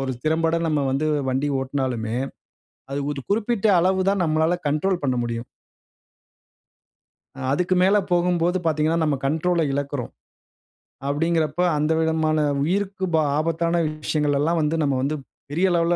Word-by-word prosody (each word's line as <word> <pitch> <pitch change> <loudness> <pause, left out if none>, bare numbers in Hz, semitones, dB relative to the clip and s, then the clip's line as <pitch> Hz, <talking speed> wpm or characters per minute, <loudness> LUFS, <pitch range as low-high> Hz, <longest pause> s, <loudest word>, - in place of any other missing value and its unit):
ஒரு 135 -1 -2
திறம்பட 165 +1 +2
நம்ம 150 -3 +1
வந்து 135 +4 0 0.2
வண்டி 135 +3 0
ஓட்டுனாலுமே, 130 -4 -2 0.8
அது 140 +1 -2
ஒரு 145 -2 -4
குறிப்பிட்ட 220 0 +1
அளவு 185 +2 +2
தான் 195 -1 +2
நம்மளால 160 +2 +2
கண்ட்ரோல் 175 +5 0
பண்ண 130 -2 +1
முடியும். 115 0 -3 2.1
அதுக்கு 180 +5 +1
மேல 195 +3 +4 0.2
போகும்போது 175 0 +2
பார்த்தீங்கன்னா. 155 +1 +1
நம்ம 150 -2 +1
கண்ட்ரோல 165 +4 +1
இழக்குறோம். 140 -2 -3 1.0
அப்டிங்கிறப்ப 160 +2 0 0.2
அந்த 150 +2 +1
விதமான 160 -1 +1 0.2
உயிருக்கு 190 +3 -1
பா 160 - +4 0.2
ஆபத்தான 165 +2 0 0.2
விஷயங்கள் 150 -2 +1
எல்லாம் 165 +3 +1
வந்து 155 +1 0
நம்ம 140 -2 +1
வந்து 140 +3 0 0.4
பெரிய 175 +6 +2
லெவல்ல, 170 +1 +2
160 Hz, 130 wpm, -23 LUFS, 145-175 Hz, 2.1 s, மேல